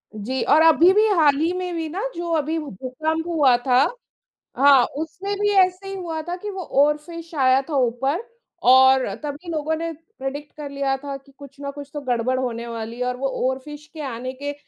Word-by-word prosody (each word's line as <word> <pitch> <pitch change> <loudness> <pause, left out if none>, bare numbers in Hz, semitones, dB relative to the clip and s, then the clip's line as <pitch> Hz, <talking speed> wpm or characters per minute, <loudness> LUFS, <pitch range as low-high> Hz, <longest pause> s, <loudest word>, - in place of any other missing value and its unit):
जी 245 +5 -3
और 315 - +6
अभी 325 +2 +6
भी 425 +2 +4
हाल 295 -4 +5
ही 325 +3 +1
में 365 -1 -3
भी 325 -1 -3
ना, 365 +6 -4
जो 345 0 -4
अभी 315 +2 -1
वो 300 -3 -5
भूकंप 310 - -3
हुआ 295 -7 +4
था। 250 -1 +4 0.8
हाँ, 275 -1 +7
उसमें 365 +6 -4
भी 415 0 +2 0.2
ऐसे 370 +2 -8
ही 390 - -5
हुआ 335 -4 -4
था 355 - -1
कि 415 +3 -6
वो 380 -2 -5 0.2
ओरफ़िश 320 +3 -1
आया 260 -1 +4
था 300 - -2
ऊपर 270 - 0 0.4
और 260 +1 +6 0.2
तभी 295 +4 -6
लोगों 315 0 -1
ने 330 +1 -3
प्रेडिक्ट 290 -4 -8
कर 295 -2 -6
लिया 275 -1 -1
था 280 0 -6
कि 275 +1 -22
कुछ 280 -1 -13
ना 280 0 -5
कुछ 285 0 -10
तो 295 - -4
गड़बड़ 255 -1 0
होने 235 -2 -3
वाली 230 +1 -6
है 250 - 0
और 250 0 -2
वो 270 +2 -1 0.2
ओरफ़िश 295 +3 -7
के 315 - -7
आने 255 -2 -5
के 285 0 -3
290 Hz, 210 wpm, -22 LUFS, 260-325 Hz, 0.8 s, हाँ